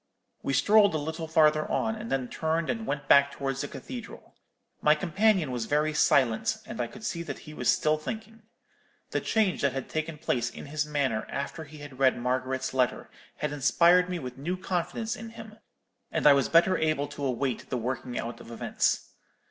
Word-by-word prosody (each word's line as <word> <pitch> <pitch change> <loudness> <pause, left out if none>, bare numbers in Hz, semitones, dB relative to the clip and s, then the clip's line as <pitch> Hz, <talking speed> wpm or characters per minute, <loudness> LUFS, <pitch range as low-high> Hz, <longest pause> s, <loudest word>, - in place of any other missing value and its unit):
We 135 - -2
strolled 205 +7 +5
a - - +2
little 160 +2 -4
farther 155 -1 +3
on, 220 - 0
and 220 +1 -7
then 130 -2 0
turned 160 +4 -1
and 225 -2 -5
went 145 0 -3
back 140 0 +6
towards 135 -1 -3
the 145 - -3
cathedral. 250 - -9 0.5
My 150 0 +5
companion 190 -2 +2
was 120 -2 -2
very 150 +1 +1
silent, 140 - +3
and 225 - -5
I - - -1
could 215 +2 -12
see 170 - -2
that 170 - -5
he 155 - -9
was 125 -5 -1
still 155 0 +3
thinking. 220 +6 -7 0.7
The - - 0
change 215 -5 +1
that 140 -2 +2
had 135 -1 -5
taken 155 0 -3
place 120 -4 -1
in - - -10
his 150 +1 -2
manner 135 -7 -1
after 140 +3 -4
he 155 +1 -12
had 145 -3 -11
read 130 -1 +4
Margaret's 130 +2 -1
letter 125 -2 0 0.2
had - - -3
inspired 170 +6 +4
me 180 - -2
with 130 -4 -7
new 175 +6 -2
confidence 190 +6 -2
in 225 0 -8
him, 220 -1 -11 0.5
and - - -1
I 145 - +9
was 140 -1 +2
better 170 +3 +5
able 155 -2 +1
to 145 - -7
await 130 -1 -2
the 130 - -1
working 125 +1 -3
out 115 +1 -4
of - - -12
events. 115 - -1
150 Hz, 195 wpm, -28 LUFS, 135-180 Hz, 0.7 s, I